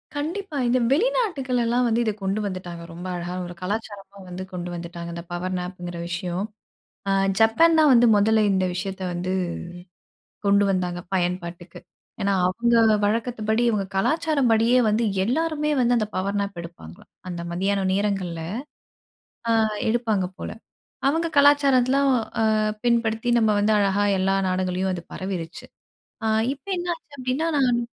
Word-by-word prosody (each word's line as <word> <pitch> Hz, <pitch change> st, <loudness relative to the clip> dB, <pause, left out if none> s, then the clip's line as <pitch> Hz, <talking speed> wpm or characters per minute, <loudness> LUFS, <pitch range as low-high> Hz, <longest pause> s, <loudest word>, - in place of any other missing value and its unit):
கண்டிப்பா, 320 Hz, +2 st, -3 dB
இந்த 250 Hz, +1 st, +3 dB
வெளிநாட்டுகள்லெல்லாம் 270 Hz, -, +1 dB
வந்து 230 Hz, +1 st, +1 dB
இத 220 Hz, -, +1 dB
கொண்டு 195 Hz, +2 st, 0 dB
வந்துட்டாங்க. 180 Hz, -3 st, -6 dB
ரொம்ப 175 Hz, +2 st, -7 dB
அழகா 175 Hz, +1 st, -4 dB
ஒரு 175 Hz, -, -7 dB
கலாச்சாரமா 200 Hz, 0 st, -5 dB
வந்து 180 Hz, +1 st, -6 dB
கொண்டு 180 Hz, -1 st, -5 dB
வந்துட்டாங்க, 170 Hz, 0 st, -7 dB
இந்த 170 Hz, 0 st, -6 dB
பவர் 185 Hz, +1 st, -3 dB
நாப் 180 Hz, 0 st, -6 dB
ங்கற 175 Hz, 0 st, -5 dB
ஒரு -, -, -5 dB
விஷயம். 180 Hz, +2 st, -3 dB, 0.6 s
அ -, -, +3 dB, 0.3 s
ஜப்பான் 320 Hz, +10 st, +5 dB
தான் 300 Hz, -3 st, +6 dB
வந்து 240 Hz, 0 st, +6 dB
மொதல 220 Hz, +2 st, +4 dB
இந்த 190 Hz, -1 st, +1 dB
விஷயத்த 190 Hz, +1 st, -4 dB
வந்து, 180 Hz, +2 st, -2 dB, 1.1 s
கொண்டு 200 Hz, 0 st, +4 dB
வந்தாங்க 180 Hz, -2 st, -1 dB
பயன்பாட்டுக்கு. 175 Hz, -1 st, -3 dB, 0.4 s
ஏன்னா, 200 Hz, 0 st, +1 dB
அவுங்க 235 Hz, +6 st, +1 dB, 0.3 s
வழக்கத்துபடி 220 Hz, +1 st, 0 dB
அவுங்க 200 Hz, -2 st, -1 dB
கலாச்சாரம் 300 Hz, +2 st, +1 dB
படியே 230 Hz, +3 st, +4 dB
வந்து 215 Hz, +3 st, +1 dB, 0.2 s
எல்லாருமே 300 Hz, +5 st, 0 dB
வந்து 245 Hz, 0 st, +3 dB
அந்த 215 Hz, -2 st, 0 dB
பவர் 200 Hz, +2 st, -1 dB
நாப் 200 Hz, -3 st, -4 dB
எடுப்பாங்களாம். 165 Hz, -, -12 dB, 0.2 s
அந்த 175 Hz, -1 st, -5 dB
மத்தியானம் 195 Hz, +1 st, 0 dB
நேரங்கள்ல. 195 Hz, -4 st, -1 dB, 1.2 s
அ -, -, +3 dB, 0.3 s
எடுப்பாங்க 220 Hz, -5 st, +1 dB
போல, -, -, -5 dB, 0.6 s
அவுங்க 330 Hz, +3 st, 0 dB
கலாச்சாரத்துல 275 Hz, -2 st, +4 dB, 0.4 s
அ -, -, +3 dB, 0.4 s
பின்படுத்தி 235 Hz, 0 st, +1 dB
நம்ம 220 Hz, -1 st, +3 dB
வந்து 215 Hz, +1 st, +3 dB
அழகா 200 Hz, 0 st, +2 dB
எல்லா 195 Hz, +1 st, +2 dB
நாடுகள்லயும் 185 Hz, 0 st, -1 dB
அது 175 Hz, -, -5 dB
பரவிருச்சு. 185 Hz, -3 st, -5 dB, 0.6 s
அ -, -, +1 dB, 0.3 s
இப்ப 270 Hz, -, -26 dB
என்ன 350 Hz, 0 st, -4 dB
ஆச்சு? 300 Hz, -3 st, -28 dB
அப்படின்னா 255 Hz, +6 st, -1 dB
நான். 245 Hz, -3 st, +3 dB
205 Hz, 145 wpm, -24 LUFS, 185-245 Hz, 1.2 s, தான்